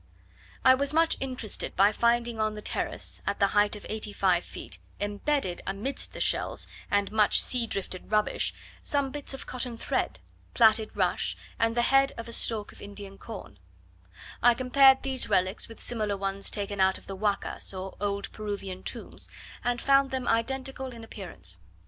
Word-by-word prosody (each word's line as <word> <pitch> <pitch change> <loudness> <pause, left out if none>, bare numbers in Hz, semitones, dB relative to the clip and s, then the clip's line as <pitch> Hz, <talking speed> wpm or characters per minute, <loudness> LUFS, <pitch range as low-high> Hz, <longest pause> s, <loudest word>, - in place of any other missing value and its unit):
I 260 - +9
was 280 +3 +2
much 330 0 +4
interested 255 -5 -2
by 200 +2 +6
finding 235 0 +1
on 215 0 0
the 210 - -7
terrace, - - -2
at - - -1
the 200 - +4
height 205 0 +4
of 210 - -10
eighty 215 -1 -3
five 180 -3 +2
feet, - - -8 0.2
embedded 205 0 -1
amidst 205 +8 -3
the - - -7
shells - - 0 0.2
and 205 0 +1
much 215 -1 +4
sea 245 -2 +2
drifted 190 -3 -4
rubbish, 210 -1 +2 0.3
some 280 -2 +1
bits 290 -1 -4
of - - -9
cotton 250 -2 -3
thread, - - -1 0.4
plaited 220 -2 +4
rush, - - +1 0.2
and 230 +1 +2
the 240 - +4
head 270 +2 +4
of 230 - -6
a 235 - -5
stalk 220 -3 +1
of - - -15
Indian 200 -1 -9
corn: 195 - -9 0.8
I 240 0 +6
compared 265 +1 +6
these 265 -3 +1
relics 185 0 +2
with 225 - -12
similar 215 -4 -2
ones 195 0 -2
taken 200 -1 -2
out 190 0 +4
of - - -15
the 195 - -6
Huacas, 205 0 -1
or 190 0 -6
old 200 -1 -1
Peruvian 200 -3 -5
tombs, - - -4 0.3
and 245 0 0
found 275 +1 +4
them 260 -2 -3
identical 265 +3 0
in 230 -1 -10
appearance. 175 - -5
215 Hz, 175 wpm, -28 LUFS, 200-255 Hz, 0.8 s, I